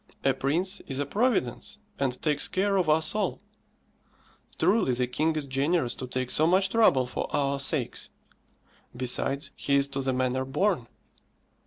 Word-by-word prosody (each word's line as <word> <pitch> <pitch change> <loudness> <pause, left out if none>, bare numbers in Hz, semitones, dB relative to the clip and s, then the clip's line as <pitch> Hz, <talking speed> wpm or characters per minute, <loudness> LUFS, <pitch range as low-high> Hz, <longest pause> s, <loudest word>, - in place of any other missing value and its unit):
A 135 - +3
prince 170 +10 0
is 135 - -3
a 145 - -1
providence, 200 - -1 0.2
and 130 -2 -1
takes 150 -2 +1
care 195 +1 0
of 185 -5 +1
us 155 +1 +2
all. 215 - -1 1.2
Truly 190 - +2
the 125 +1 +1
king 155 +6 0
is 150 -2 -2
generous 135 0 0
to 130 - -6
take 130 0 -2
so 155 - +3
much 190 +2 +3
trouble 215 - +4
for 125 - -4
our 140 -1 0
sakes. 135 -2 -2 0.9
Besides, 135 +3 0
he 140 - 0
is 140 0 +3
to 135 0 -3
the 135 0 0
manner 130 0 0
born. 135 - 0
140 Hz, 160 wpm, -27 LUFS, 130-175 Hz, 1.2 s, trouble